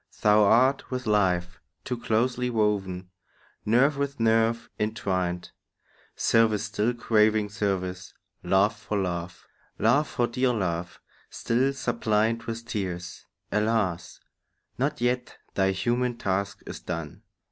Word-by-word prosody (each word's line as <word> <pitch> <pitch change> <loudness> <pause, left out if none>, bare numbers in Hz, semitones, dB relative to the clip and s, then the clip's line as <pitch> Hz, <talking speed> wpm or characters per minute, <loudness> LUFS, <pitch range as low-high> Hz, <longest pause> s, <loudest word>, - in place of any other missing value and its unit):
Thou 105 0 +6
art 130 +6 +3
with 130 0 -4
life 95 -4 +1 0.2
Too 125 - -2
closely 125 +2 0
woven, 95 -5 -1 0.6
nerve 135 +6 +4
with 140 -1 -2
nerve 115 0 +2
intwined; 95 -5 -2 0.6
Service 110 -2 +3
still 110 +2 -1
craving 110 -2 +2
service, 95 -3 -2 0.3
love 95 +4 +3
for 105 0 -4
love, 90 -2 -3 0.3
Love 150 +1 +3
for 120 - 0
dear 125 +1 +1
love, 90 -5 -3 0.3
still 125 +4 0
suppliant 115 -3 0
with 115 0 -5
tears. 90 -6 -5 0.2
Alas, 105 -5 0 0.6
not 140 +2 -1
yet 125 0 -1 0.2
thy 95 -1 +2
human 120 +5 0
task 100 0 -2
is - - -7
done! 85 -4 -6
110 Hz, 115 wpm, -26 LUFS, 95-120 Hz, 0.6 s, Thou